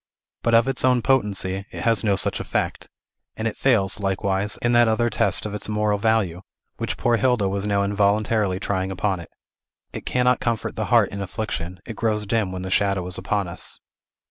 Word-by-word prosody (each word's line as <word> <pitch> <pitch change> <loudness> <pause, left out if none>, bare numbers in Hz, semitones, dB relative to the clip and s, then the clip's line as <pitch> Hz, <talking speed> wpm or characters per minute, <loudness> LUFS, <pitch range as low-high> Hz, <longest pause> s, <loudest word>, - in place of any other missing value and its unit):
But, 115 -1 +3
of 115 +1 +5
its 135 -2 -1
own 125 -2 +3
potency, 100 -7 0
it - - -6
has 115 -4 +2
no 100 -3 +3
such 95 - -1
effect; - - -3 0.5
and 110 - -2
it 110 - -3
fails, 110 -8 +2
likewise, 95 +1 -1
in 120 - +2
that 120 -1 +5
other 120 +1 +1
test - - +1
of 105 - -4
its 105 - -4
moral 105 -1 +1
value 100 -5 +1 0.4
which - - -3
poor 120 -1 +2
Hilda 120 -3 +2
was 100 +1 -1
now 100 -1 +2
involuntarily 100 -1 +1
trying 95 -1 -1
upon 95 0 -1
it. 85 - -10 0.6
It - - -7
cannot 125 0 +2
comfort 115 -3 -2
the 110 - -2
heart 115 -3 +4
in 100 - -6
affliction; 90 -3 -4
it 115 - -7
grows 105 -2 0
dim 105 -2 0
when 95 0 -5
the 95 - -5
shadow 100 -2 +1
is 90 0 -1
upon 100 -3 -1
us. 85 - -3
105 Hz, 195 wpm, -23 LUFS, 95-115 Hz, 0.6 s, of